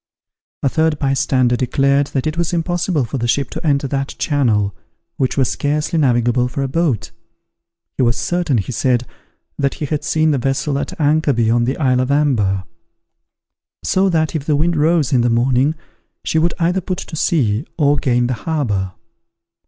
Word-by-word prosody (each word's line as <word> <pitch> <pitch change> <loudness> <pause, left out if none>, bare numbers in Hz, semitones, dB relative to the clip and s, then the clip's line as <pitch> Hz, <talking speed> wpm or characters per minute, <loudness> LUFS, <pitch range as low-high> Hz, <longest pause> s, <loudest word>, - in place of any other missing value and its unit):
A 135 - +3
third 160 +1 +1
bystander 135 -3 +1
declared 140 +3 +1
that 135 -3 -2
it 155 0 -1
was 170 0 -1
impossible 175 -3 0
for 130 +3 -4
the 120 - -1
ship 135 +2 0
to - - -6
enter 140 -1 +1
that 135 0 -3
channel, 110 -9 +1 0.4
which 130 +1 -1
was 135 -2 +2
scarcely 150 +3 -1
navigable 125 -2 +2
for 135 +2 -3
a - - -1
boat. 135 - -1 0.9
He - - 0
was 115 -2 +2
certain, 175 -7 0
he 105 +4 -2
said, 125 0 +1 0.5
that 140 -1 0
he 150 - -4
had 150 0 -2
seen 155 -1 +2
the 140 - +1
vessel 135 +2 -1
at - - -5
anchor 150 -1 +2
beyond 120 +1 +2
the 130 - -1
isle 130 -4 +2
of 130 +1 0
Amber; 120 -10 +1 1.2
so 190 +1 +2
that, 160 -3 0
if 150 -2 -3
the 150 - +3
wind 165 +4 +1
rose 155 -2 +2
in 125 - +4
the 120 - +2
morning, 125 +5 +2 0.5
she 160 - +1
would 170 +1 +1
either 175 +3 +1
put 185 +1 -3
to - - -7
sea, 130 -7 0
or 145 -2 +3
gain 125 -4 +1
the 125 - -1
harbour. 105 - -2
140 Hz, 180 wpm, -18 LUFS, 125-155 Hz, 1.2 s, in